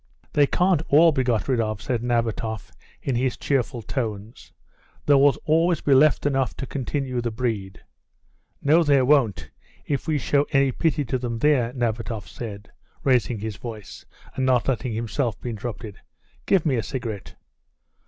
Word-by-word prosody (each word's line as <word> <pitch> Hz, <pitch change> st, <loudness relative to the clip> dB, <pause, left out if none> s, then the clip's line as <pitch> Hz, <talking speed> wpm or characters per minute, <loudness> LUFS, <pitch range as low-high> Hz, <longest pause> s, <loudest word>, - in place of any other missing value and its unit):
"They 145 Hz, -1 st, +4 dB
can't 180 Hz, -1 st, +2 dB
all 165 Hz, +3 st, +6 dB
be 135 Hz, -3 st, 0 dB
got 120 Hz, -3 st, 0 dB
rid 130 Hz, -3 st, +1 dB
off," 110 Hz, -2 st, -2 dB
said 115 Hz, +2 st, -2 dB
Nabatoff, 115 Hz, -3 st, -2 dB, 0.3 s
in 135 Hz, -, -1 dB
his 125 Hz, +1 st, 0 dB
cheerful 130 Hz, -3 st, -1 dB
tones. 110 Hz, -3 st, -5 dB, 0.5 s
"There 145 Hz, -, +5 dB
will 140 Hz, -2 st, +5 dB
always 165 Hz, +1 st, +2 dB
be 140 Hz, -, +3 dB
left 140 Hz, +2 st, +4 dB
enough 135 Hz, -3 st, 0 dB
to 135 Hz, -, -4 dB
continue 135 Hz, -1 st, -3 dB
the 120 Hz, -, -2 dB
breed. 110 Hz, -5 st, -4 dB, 0.8 s
No, 155 Hz, +4 st, +5 dB
there 140 Hz, -4 st, +3 dB
won't, 130 Hz, -8 st, +2 dB, 0.3 s
if 140 Hz, -3 st, -2 dB
we 155 Hz, -2 st, +1 dB
show 145 Hz, +1 st, +1 dB
any 135 Hz, -1 st, +3 dB
pity 150 Hz, +1 st, 0 dB
to 130 Hz, +1 st, -2 dB
them 120 Hz, -2 st, -3 dB
there," 125 Hz, -2 st, +2 dB
Nabatoff 115 Hz, -5 st, -3 dB
said, 105 Hz, -2 st, -8 dB, 0.3 s
raising 125 Hz, -4 st, +2 dB
his 110 Hz, -2 st, -5 dB
voice; 110 Hz, -4 st, -9 dB, 0.3 s
and 130 Hz, -, -2 dB
not 130 Hz, -2 st, +2 dB
letting 125 Hz, -2 st, -1 dB
himself 115 Hz, +1 st, -2 dB
be 120 Hz, -, -5 dB
interrupted, 110 Hz, -1 st, -7 dB, 0.5 s
"Give 190 Hz, -4 st, +3 dB
me 135 Hz, -5 st, +2 dB
a -, -, +1 dB
cigarette." 115 Hz, -3 st, -6 dB
125 Hz, 165 wpm, -24 LUFS, 115-140 Hz, 0.8 s, all